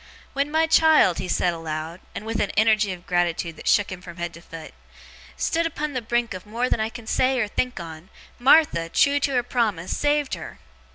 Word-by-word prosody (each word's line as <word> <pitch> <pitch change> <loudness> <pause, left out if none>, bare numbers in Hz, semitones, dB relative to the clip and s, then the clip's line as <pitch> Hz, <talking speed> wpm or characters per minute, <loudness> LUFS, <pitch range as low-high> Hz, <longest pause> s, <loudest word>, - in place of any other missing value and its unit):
When 280 +1 0
my 320 +2 +2
child,' 315 - +4
he 185 - -4
said 175 0 +1
aloud, 160 +1 -5 0.2
and 215 - -6
with 225 0 -3
an 200 - 0
energy 215 -2 +3
of 180 -1 -8
gratitude 175 -2 -1
that - - -10
shook 205 -2 +3
him 185 -1 -7
from 175 -1 -11
head 170 -1 -4
to 170 - -12
foot, 165 -2 -10 0.6
'stood 335 0 0
upon 300 -2 -4
the 255 - -2
brink 240 0 -1
of 185 +2 -9
more 240 +4 -1
than - - +1
I 220 0 -1
can 235 0 -10
say 255 +3 +1
or 215 - 0
think 250 +2 -2
on 165 +1 -9 0.3
Martha, 250 - +4
trew 285 +10 +3
to 280 - +1
her 245 -1 +2
promise, 220 -8 -1
saved 290 -1 0
her. - - -7
215 Hz, 215 wpm, -23 LUFS, 175-260 Hz, 0.6 s, child